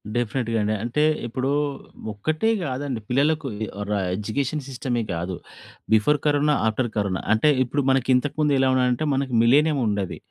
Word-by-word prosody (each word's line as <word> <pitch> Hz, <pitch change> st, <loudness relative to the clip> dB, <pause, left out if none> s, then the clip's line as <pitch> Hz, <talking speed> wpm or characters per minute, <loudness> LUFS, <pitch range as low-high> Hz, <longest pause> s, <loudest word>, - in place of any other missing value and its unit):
డెఫినిట్‌గా 120 Hz, -1 st, -1 dB
అండి. 105 Hz, +1 st, 0 dB
అంటే 120 Hz, +6 st, 0 dB, 0.2 s
ఇప్పుడు 130 Hz, +3 st, -2 dB, 0.6 s
ఒక్కటే 155 Hz, -, -1 dB
గాదండి. 130 Hz, -4 st, -3 dB
పిల్లలకు 145 Hz, +3 st, +1 dB
ఇది 110 Hz, 0 st, -4 dB, 0.2 s
ర -, -, -2 dB, 0.2 s
ఎడ్యుకేషన్ 135 Hz, +8 st, -2 dB
సిస్టమే 125 Hz, -3 st, -2 dB
కాదు. 85 Hz, +2 st, -3 dB, 0.6 s
Before 145 Hz, +8 st, +3 dB
corona, 150 Hz, 0 st, +3 dB
after 120 Hz, +2 st, 0 dB
corona. 100 Hz, -2 st, -1 dB
అంటే 110 Hz, +8 st, +3 dB
ఇప్పుడు 140 Hz, +3 st, -1 dB
మనకి 130 Hz, -1 st, +1 dB
ఇంతకు 145 Hz, +3 st, -1 dB
ముందు 150 Hz, -1 st, +3 dB
ఎలా 130 Hz, 0 st, +3 dB
ఉన్నాదంటే, 125 Hz, +3 st, +1 dB
మనకి 135 Hz, -2 st, -1 dB
మిలినియం 145 Hz, +4 st, +4 dB
ఉండేది. 100 Hz, -3 st, -2 dB
130 Hz, 150 wpm, -23 LUFS, 110-145 Hz, 0.6 s, మిలినియం